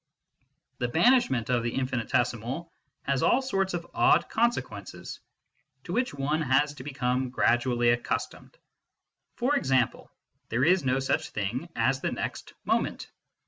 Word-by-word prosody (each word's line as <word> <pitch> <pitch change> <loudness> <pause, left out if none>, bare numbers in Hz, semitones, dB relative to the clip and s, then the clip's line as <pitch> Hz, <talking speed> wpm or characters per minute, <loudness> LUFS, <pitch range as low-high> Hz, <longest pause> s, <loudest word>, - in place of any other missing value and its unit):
The 125 - 0
banishment 160 - +3
of 120 -1 +2
the 120 0 -3
infinitesimal 125 +4 -1 0.3
has 135 -2 0
all 255 - +4
sorts 195 -8 -1
of 170 -1 -4
odd 355 +1 +3
consequences, 235 +1 -2 0.6
to - - -6
which 250 +1 +1
one 145 +3 -1
has 145 +1 +2
to 135 -3 -10
become 130 -2 -1
gradually 120 -1 +2
accustomed. 120 - -3 0.8
For 260 +4 +1
example, 130 - +1 0.4
there 120 +4 +1
is 180 +1 +4
no 130 0 +1
such 135 0 -1
thing 120 - -3
as 130 +4 +1
the - - -1
next - - -5
moment. - - -1
135 Hz, 135 wpm, -28 LUFS, 125-175 Hz, 0.8 s, all